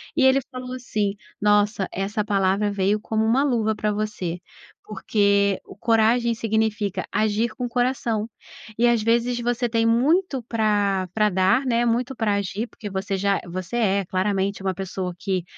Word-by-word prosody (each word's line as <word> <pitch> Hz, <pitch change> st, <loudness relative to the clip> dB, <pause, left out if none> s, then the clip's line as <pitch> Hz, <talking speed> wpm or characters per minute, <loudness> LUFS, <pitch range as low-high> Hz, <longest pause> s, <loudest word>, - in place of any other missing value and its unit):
E 295 Hz, -, +2 dB
ele 265 Hz, +1 st, +5 dB
falou 255 Hz, -1 st, -6 dB
assim: 215 Hz, -5 st, -2 dB, 0.3 s
"Nossa, 205 Hz, -1 st, +2 dB
essa 205 Hz, +3 st, -2 dB
palavra 200 Hz, 0 st, +1 dB
veio 200 Hz, +1 st, +1 dB
como 220 Hz, +1 st, -1 dB
uma 245 Hz, +5 st, +3 dB
luva 225 Hz, -6 st, +1 dB
pra 210 Hz, 0 st, -1 dB
você, 205 Hz, -5 st, -3 dB, 0.4 s
porque 200 Hz, -1 st, +1 dB
o -, -, -12 dB
coragem 235 Hz, +1 st, +2 dB
significa 220 Hz, -3 st, -1 dB
agir 215 Hz, +2 st, +1 dB
com 250 Hz, -, -3 dB
o -, -, -4 dB
coração, 240 Hz, -3 st, 0 dB, 0.5 s
e 240 Hz, +1 st, +4 dB
às 235 Hz, -2 st, +3 dB
vezes 235 Hz, +2 st, +1 dB
você 240 Hz, 0 st, -1 dB
tem 225 Hz, 0 st, +1 dB
muito 270 Hz, +6 st, +2 dB
pra 205 Hz, -4 st, 0 dB
pra 215 Hz, -1 st, +3 dB
dar, 190 Hz, +7 st, +2 dB
né, 240 Hz, -1 st, +1 dB
muito 245 Hz, +3 st, 0 dB
pra 220 Hz, -3 st, 0 dB
agir, 200 Hz, +2 st, -2 dB
porque 210 Hz, -2 st, -9 dB
você 195 Hz, +1 st, -3 dB
já 200 Hz, +1 st, +1 dB
você 185 Hz, +4 st, -5 dB
é 200 Hz, -4 st, +1 dB
claramente 195 Hz, +1 st, -1 dB
uma 190 Hz, -1 st, 0 dB
pessoa 185 Hz, -1 st, -4 dB
que, 185 Hz, -1 st, -2 dB
215 Hz, 165 wpm, -23 LUFS, 200-235 Hz, 0.5 s, ele